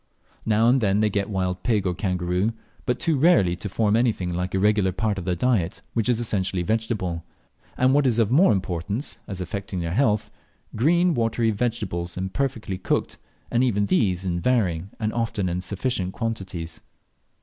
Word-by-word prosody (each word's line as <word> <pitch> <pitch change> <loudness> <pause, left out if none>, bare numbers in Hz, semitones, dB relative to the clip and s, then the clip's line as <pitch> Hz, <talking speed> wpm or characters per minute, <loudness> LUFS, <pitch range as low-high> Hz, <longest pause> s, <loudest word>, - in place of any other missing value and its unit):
Now 110 +1 +3
and 130 +2 +4
then 100 -1 +2
they 105 0 +2
get 100 0 -1
wild 90 -2 -1
pig 110 -5 +1
or 90 - +1
kangaroo, 90 +3 -1 0.3
but 125 - 0
too 160 -5 +1
rarely 130 - +4
to 100 - -5
form 105 +2 +1
anything 110 -7 +1
like 90 +2 -2
a - - +2
regular 105 -1 +3
part 105 +1 -1
of 90 - -7
their 90 -1 0
diet, 105 -2 0
which 115 +1 0
is 120 -2 +2
essentially 95 -5 -1
vegetable; 105 -5 -1 0.5
and 130 +1 +4
what 145 -1 +4
is 120 -3 +2
of 115 -2 +2
more 165 +9 +6
importance, 95 - -2
as 95 -2 -6
affecting 100 -1 -4
their 85 -1 -2
health, 110 -3 +1 0.4
green, 170 +8 +3
watery 115 -2 +1
vegetables, 100 -7 -2
imperfectly 110 0 -2
cooked, - - -1 0.3
and 120 +2 +3
even 105 -5 +2
these 95 -2 +1
in 85 -2 -1
varying 95 -6 +1
and 110 -1 -1
often 115 -5 -1
in 90 +1 -2
sufficient 95 0 -2
quantities. 95 -8 -4
105 Hz, 175 wpm, -24 LUFS, 90-115 Hz, 0.5 s, more